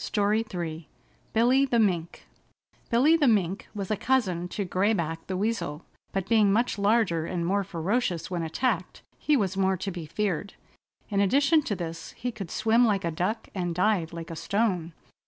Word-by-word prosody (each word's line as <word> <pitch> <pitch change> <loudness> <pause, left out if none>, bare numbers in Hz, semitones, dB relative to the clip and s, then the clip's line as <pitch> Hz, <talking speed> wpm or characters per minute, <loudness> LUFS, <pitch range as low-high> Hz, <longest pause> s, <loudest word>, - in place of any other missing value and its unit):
STORY 210 +1 +1
III 165 -3 -5 0.4
BILLY 245 +4 +4
THE 240 - +1
MINK 180 -7 0 0.6
Billy 270 +8 +5
the 300 -4 +3
Mink 195 -4 +1
was 200 -1 -4
a - - +3
cousin 205 -7 0
to 200 +3 -3
Gray 190 +4 +1
Back 165 -4 -3
the 185 - -2
Weasel, 190 -7 -2 0.3
but 195 -1 -2
being 215 -2 +4
much 230 +1 +1
larger 200 -6 +2
and 175 -2 -2
more 200 +3 +1
ferocious 185 +1 -2
when 175 -2 -1
attacked 180 +3 -2 0.2
he 300 -1 +2
was 195 -5 0
more 190 -1 +2
to 195 +2 -4
be 170 -3 -7
feared. 200 +1 -2 0.5
In 200 -2 0
addition 280 - +4
to 205 - -1
this 165 -2 -6
he 245 +1 -4
could 200 -6 -7
swim 225 +6 +3
like 205 -6 +2
a 170 - 0
duck 180 +8 -2
and 175 -3 -2
dive 180 -3 +1
like 170 0 -7
a - - -5
stone. 180 -2 -1
195 Hz, 180 wpm, -27 LUFS, 170-225 Hz, 0.6 s, Billy